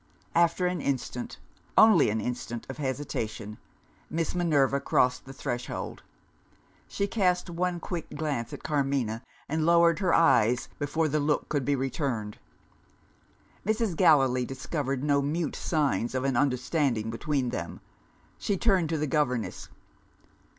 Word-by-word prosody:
After 170 +1 +3
an 180 0 -1
instant 125 - -3 0.4
only 215 - +7
an 110 +1 0
instant 120 0 -4
of 130 - -10
hesitation, 115 -6 -4 0.5
Miss 165 0 -1
Minerva 145 -6 +2
crossed 125 -2 +1
the 135 - -9
threshold. 120 -2 -5 0.9
She 200 - -1
cast 185 -4 0
one 175 +1 -1
quick 170 -1 -5
glance 145 -6 -2
at - - -8
Carmina, 135 -7 0 0.3
and 155 +1 -1
lowered 170 +1 +4
her 185 -3 +1
eyes 125 -7 +4
before 155 +2 0
the 155 +1 0
look 150 +1 0
could 145 -4 -1
be 145 - +2
returned. 130 -5 -3 1.2
Mrs. 220 -2 0
Gallilee 135 -8 +4
discovered 135 +1 -3
no 145 -1 +3
mute 150 +3 -1
signs 135 - 0
of 130 - 0
an 135 -2 0
understanding 125 -3 +1
between 130 +2 -1
them. 85 -8 -5 0.6
She 200 - -1
turned 190 -6 +2
to 165 - 0
the 150 - 0
governess. 130 -6 -1
145 Hz, 135 wpm, -28 LUFS, 125-165 Hz, 1.2 s, only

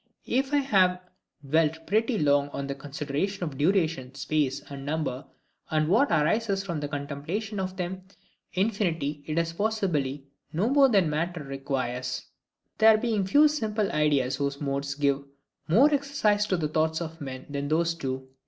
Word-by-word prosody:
If 265 +2 0
I 290 - +3
have 190 -10 +3 0.5
dwelt 160 +2 +1
pretty 220 +3 +1
long 145 -3 +3
on 140 -1 -4
the 140 - -3
consideration 145 +7 -3
of 155 -5 -4
duration, 155 -4 +1
space, 140 -1 0
and 140 -1 -8
number, 145 -3 -2 0.5
and 155 -1 +1
what 230 - +4
arises 195 +6 +1
from 170 -5 -3
the 145 - -3
contemplation 150 +9 -4
of 185 0 -3
them,—Infinity, 185 -3 -3
it 155 0 -2
is 165 0 0
possibly 165 -10 -1 0.3
no 190 +9 +1
more 275 -1 +6
than 200 -5 +4
the 160 - -1
matter 165 +1 -2
requires; 130 -3 -3 0.5
there 220 0 +7
being 215 -4 0
few 290 +9 +6
simple 220 -8 -1
ideas 145 -4 +1
whose 140 -1 -2
MODES 140 0 -2
give 140 -1 +1 0.4
more 265 - +5
exercise 265 -8 +1
to 185 - +1
the 155 -3 0
thoughts 160 +1 0
of 165 -1 -6
men 130 -2 -6
than 140 0 -2
those 165 +3 +2
do. 130 -4 -4
160 Hz, 160 wpm, -27 LUFS, 140-200 Hz, 0.5 s, there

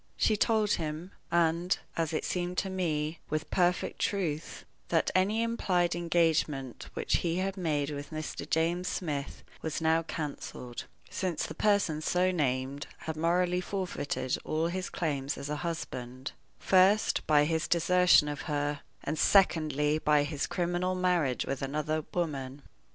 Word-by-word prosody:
She 215 - +3
told 215 0 +2
him 160 +3 -2 0.2
and, 170 +1 +2 0.2
as 165 -1 0
it 155 - -2
seemed 180 0 -2
to 190 - 0
me, 160 -4 -1
with 155 0 -2
perfect 180 -1 +1
truth 165 -7 -2 0.2
that - - +1
any 205 +5 +2
implied 180 -7 +1
engagement 160 -6 0
which - - +1
he 170 -1 -1
had 190 +1 -1
made 155 -6 -1
with 145 0 -6
Mr. 155 -1 -5
James 170 +3 +1
Smith 145 -5 -3 0.2
was 160 -2 -2
now 160 0 +3
canceled, 145 -6 -6 0.3
since 185 -4 -1
the - - -6
person 200 -7 +2
so 180 +3 +2
named 135 -3 -1
had 160 - -4
morally 175 +3 +1
forfeited 145 -9 -2
all 160 +2 0
his 185 +1 -3
claims 145 -4 -2
as 140 - -6
a 150 - -1
husband, 130 -6 -5 0.3
first, 195 +3 +4
by 150 -1 +5
his 160 +1 0
desertion 180 -2 +5
of 145 -1 -4
her, 145 0 -1 0.2
and, 155 - -2
secondly, 155 -6 +3
by 150 -1 +3
his 145 +1 -2
criminal 175 +1 -1
marriage 175 -8 +1
with 135 -1 -3
another 150 +3 -1
woman. 140 -5 -3
160 Hz, 145 wpm, -30 LUFS, 150-180 Hz, 0.3 s, by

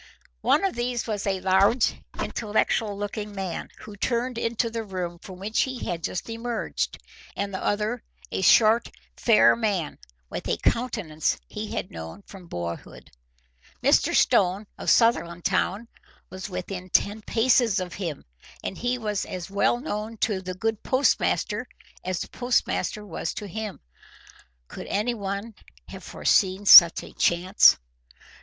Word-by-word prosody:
One 315 - +3
of 385 - 0
these 240 0 -2
was 210 -3 -3
a 190 -1 -1
large, 195 +5 +3 0.3
intellectual 215 -1 -1
looking 205 0 -5
man, 190 -3 -4
who 210 - -10
turned 235 +3 -1
into 230 0 -1
the 230 0 -3
room 180 -4 -5
from 185 +1 -11
which 205 +4 -1
he 260 -2 -3
had 170 -2 -4
just 180 - -3
emerged, 230 +1 -3 0.4
and 200 0 -3
the 190 - -4
other 215 +3 -1 0.3
a - - -2
short, 220 +4 +5 0.3
fair 230 -3 +5
man, 205 -8 -2 0.3
with - - -6
a 85 - 0
countenance 210 - -1
he - - -6
had - - -4
known 80 - -9
from 190 -3 -13
boyhood. 85 - -7 0.7
Mr. - - +3
Stone 190 +3 +3
of - - -3
Sutherlandtown 190 0 +2 0.4
was 185 +2 -7
within 185 0 -6
ten 205 +4 +1
paces 230 -2 +2
of 180 -1 -5
him, 170 -7 -5 0.4
and 190 - -5
he 245 +1 0
was 210 -4 -2
as 180 0 -7
well 200 +4 +2
known 225 -4 -5
to 205 -3 0
the 185 -1 -6
good 220 +2 -2
postmaster 260 +2 +1 0.4
as 185 -1 -2
the - - -6
postmaster 245 -3 -1
was 165 -3 -4
to 210 - -5
him. 210 +1 -6 0.9
Could - - -9
anyone 205 0 -2 0.4
have - - -9
foreseen 190 +1 +1
such 170 -3 +10
a - - -12
chance! 180 +3 +4
205 Hz, 145 wpm, -25 LUFS, 185-230 Hz, 0.9 s, such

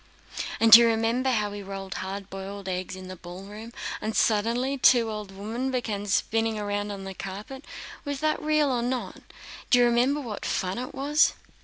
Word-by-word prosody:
"And 225 0 +4
do 225 - +14
you 235 - +5
remember 230 +3 +1
how 210 -4 0
we 205 0 -6
rolled 195 -1 -6
hard 195 +1 -5
boiled 195 +1 -7
eggs 185 0 -3
in 185 0 -9
the 185 - -7
ballroom, 195 +6 -10 0.3
and 215 0 -3
suddenly 235 +5 +2
two 235 -3 +5
old 210 -2 -6
women 220 +7 -4
began 220 -6 -2
spinning 225 +3 +1
round 205 0 -2
on 195 -1 -6
the 195 0 -6
carpet? 205 +9 -8 0.4
Was 285 -2 -4
that 310 0 +1
real 305 -2 +2
or 245 -2 0
not? 250 +1 -3 0.5
Do 250 - +6
you 245 - +6
remember 245 +5 +2
what 230 -7 -6
fun 190 +3 -1
it 255 - -6
was?" 290 +3 +3
220 Hz, 185 wpm, -26 LUFS, 195-250 Hz, 0.5 s, do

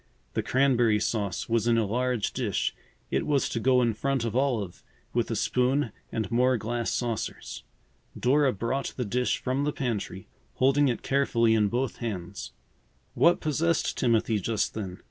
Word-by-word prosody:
The - - 0
cranberry 120 -5 +3
sauce 100 -5 -2
was 115 -1 +1
in 115 -1 +4
a 115 - +2
large 125 +1 -1
dish. 115 -8 -1 0.4
It - - 0
was 145 -2 +2
to 115 - -2
go 125 +1 +3
in 115 -2 +2
front 135 +2 -1
of 115 - -3
Olive, 120 -9 -1 0.3
with - - 0
a - - -1
spoon 125 0 +1 0.2
and 110 0 -3
more 125 +2 +3
glass 115 +1 -2
saucers. 115 -3 -3 0.6
Dora 135 +2 +3
brought 120 +6 -3
the 125 - -1
dish 125 +4 0
from 130 +2 -1
the 150 - +1
pantry, 110 -9 -4 0.3
holding 135 +2 +3
it 120 - -1
carefully 120 -5 +2
in 105 -2 +3
both 125 +3 -2
hands. 100 -5 -5 0.6
What 175 +1 +4
possessed 155 +2 0
Timothy 115 -2 +2
just 110 +1 -1
then? 95 -4 -5
120 Hz, 165 wpm, -27 LUFS, 110-130 Hz, 0.6 s, in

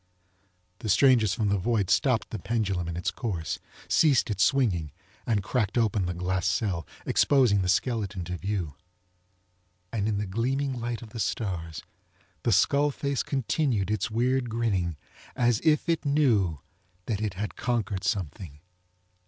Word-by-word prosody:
The 110 - -5
strangers 110 -1 +4
from 110 -4 0
the 100 -1 +1
void 105 -1 0
stopped 125 0 +2
the 110 - -4
pendulum 100 -5 -1
in 85 0 -4
its 90 - -1
course, 95 -10 -3 0.3
ceased 140 -8 +3
its 100 0 +2
swinging 100 - +1 0.4
and 105 -5 +1
cracked 110 0 -1
open 105 -5 +1
the 90 - -3
glass 90 0 -1
cell, 90 -3 -1 0.2
exposing 125 -8 +4
the 90 - -1
skeleton 105 -3 0
to 90 +2 -4
view. 90 -5 -3 1.2
And 105 -2 0
in 105 -2 0
the 105 - -1
gleaming 130 +8 -1
light 120 0 -4
of 110 - -12
the 115 - -7
stars 90 -6 -3 0.6
the 120 - +1
skull 140 +9 +4
face 140 -1 -2
continued 130 -6 0
its 105 -1 -1
weird 125 +2 +1
grinning 100 -8 -1 0.4
as 120 -2 +2
if 155 -1 +3
it 165 -1 +1
knew 115 - +2 0.4
that 105 -2 -2
it 105 -4 -2
had 105 +3 -4
conquered 110 -6 -1
something. 85 -5 -3
110 Hz, 155 wpm, -27 LUFS, 95-120 Hz, 1.2 s, strangers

